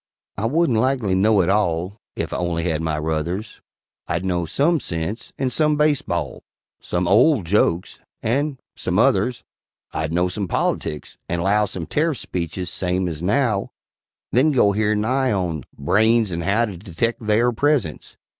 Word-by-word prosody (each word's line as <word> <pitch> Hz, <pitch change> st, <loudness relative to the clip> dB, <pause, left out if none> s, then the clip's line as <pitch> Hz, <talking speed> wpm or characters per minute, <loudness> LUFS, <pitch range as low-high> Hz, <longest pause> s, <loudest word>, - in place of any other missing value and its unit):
I 105 Hz, +3 st, -1 dB
wouldn't 150 Hz, -4 st, +2 dB
likely 125 Hz, -5 st, +1 dB
know 100 Hz, +2 st, +4 dB
it 90 Hz, -, 0 dB
all 95 Hz, -1 st, 0 dB, 0.2 s
Ef -, -, -3 dB
I -, -, -1 dB
only 85 Hz, -2 st, -1 dB
had 80 Hz, -2 st, 0 dB
my 80 Hz, -1 st, -1 dB
ruthers; 80 Hz, +7 st, -3 dB, 0.5 s
I'd 85 Hz, +3 st, -2 dB
know 90 Hz, -2 st, 0 dB
some 155 Hz, -, +2 dB
sense, 85 Hz, +2 st, -4 dB
and 130 Hz, -2 st, -1 dB
some 150 Hz, +2 st, +2 dB
base 150 Hz, -1 st, +3 dB
ball -, -, -3 dB, 0.4 s
Some 90 Hz, 0 st, -2 dB
old 110 Hz, -, +4 dB
jokes, 85 Hz, -1 st, +1 dB, 0.2 s
and 140 Hz, +4 st, 0 dB, 0.2 s
some -, -, -2 dB
others: 115 Hz, +6 st, +2 dB, 0.5 s
I'd 80 Hz, 0 st, -2 dB
know 90 Hz, +2 st, +2 dB
some 95 Hz, +2 st, -3 dB
politics, 75 Hz, -2 st, -2 dB
and 85 Hz, 0 st, -1 dB
'low 105 Hz, +2 st, +3 dB
Some 90 Hz, -3 st, -5 dB
tarif 155 Hz, -, 0 dB
speeches 85 Hz, -2 st, -4 dB
same 90 Hz, 0 st, -1 dB
as 80 Hz, -2 st, -5 dB
now, 105 Hz, +2 st, 0 dB, 0.6 s
Then 135 Hz, +6 st, +4 dB
go 120 Hz, -7 st, +4 dB
hear 105 Hz, +1 st, +1 dB
Nye 130 Hz, +5 st, +1 dB
on 85 Hz, -, -2 dB
"Branes 110 Hz, +7 st, +3 dB
and 85 Hz, 0 st, -3 dB
How 105 Hz, +4 st, +2 dB
To 100 Hz, -5 st, -7 dB
Detect 105 Hz, +7 st, -2 dB
Theyr 110 Hz, +3 st, +2 dB
Presence." 120 Hz, -, -1 dB
100 Hz, 165 wpm, -22 LUFS, 85-120 Hz, 0.6 s, know